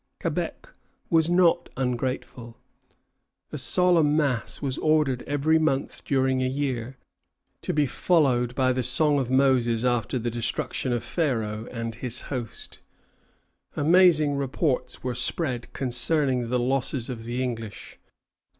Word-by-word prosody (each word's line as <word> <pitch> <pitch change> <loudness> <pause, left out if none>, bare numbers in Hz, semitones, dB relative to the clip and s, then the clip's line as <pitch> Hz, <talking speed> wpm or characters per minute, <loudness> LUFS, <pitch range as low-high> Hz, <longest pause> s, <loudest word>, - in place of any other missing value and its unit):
Quebec - - -3 0.4
was 165 0 +3
not 175 -1 +3
ungrateful. 125 -2 -3 0.9
A - - -4
solemn 170 -5 +2
mass 135 -7 -1
was 135 -2 -3
ordered 150 -5 +2
every 145 +3 +2
month 140 -4 -1
during 130 -1 +1
a 130 - +1
year, 130 -2 -3 0.6
to - - -2
be 150 -1 +2
followed 130 -6 +1
by 130 -1 +2
the 130 - -1
song 145 +4 +2
of 130 -3 -2
Moses 130 -3 +2
after 120 0 0
the 120 0 -2
destruction 120 +2 -2
of 120 -1 -1
Pharaoh 115 -7 -2
and 115 -1 -5
his 125 +1 0
host. 120 -4 -5 1.0
Amazing 155 -3 +4
reports 140 +1 -2
were 125 -1 -2
spread 125 -1 -1
concerning 130 -1 +1
the 125 - +1
losses 130 0 0
of 120 -3 -6
the 120 +2 -2
English. 115 -4 -6
130 Hz, 130 wpm, -25 LUFS, 120-145 Hz, 1.0 s, Amazing